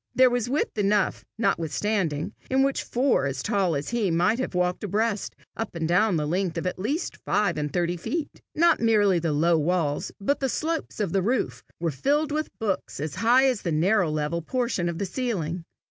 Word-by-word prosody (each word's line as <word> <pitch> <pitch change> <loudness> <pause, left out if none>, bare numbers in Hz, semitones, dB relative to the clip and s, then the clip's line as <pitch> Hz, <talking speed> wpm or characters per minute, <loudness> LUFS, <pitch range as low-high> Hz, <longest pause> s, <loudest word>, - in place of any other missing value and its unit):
There 255 -1 +6
was 245 -1 0
width 270 -5 -1
enough 205 -1 +1
notwithstanding, 170 -5 0 0.2
in 265 +1 +3
which 275 0 +1
four 250 - +1
as 135 - -3
tall 195 -6 +1
as 140 +1 -3
he 230 -5 0
might 175 +8 +2
have 255 - -3
walked 180 +2 0
abreast 210 +1 -1 0.2
up 225 - -4
and 165 -1 -1
down 180 +1 +3
a 150 - -1
length 175 +2 -1
of 165 - -3
at 180 - -2
least 275 - -2
five 205 0 0
and 150 -1 -2
thirty 175 +2 0
feet. 300 - -4
Not 340 +1 +4
merely 210 -5 +3
the 165 -1 -1
low 165 +3 +3
walls, 155 -2 0
but 280 +9 0
the 270 - 0
slopes 320 +1 -2
of 200 -6 -1
the 195 - +2
roof 235 +6 -1 0.2
were 165 -1 0
filled 290 - +1
with 310 +1 -1
books 200 -9 -2
as 150 0 -3
high 245 +4 +5
as 255 -5 +1
the 170 - -2
narrow 180 +3 +2
level 155 +2 -1
portion 235 -3 -1
of 170 - -4
the 200 - -1
ceiling. 180 - -3
195 Hz, 200 wpm, -26 LUFS, 170-240 Hz, 0.2 s, There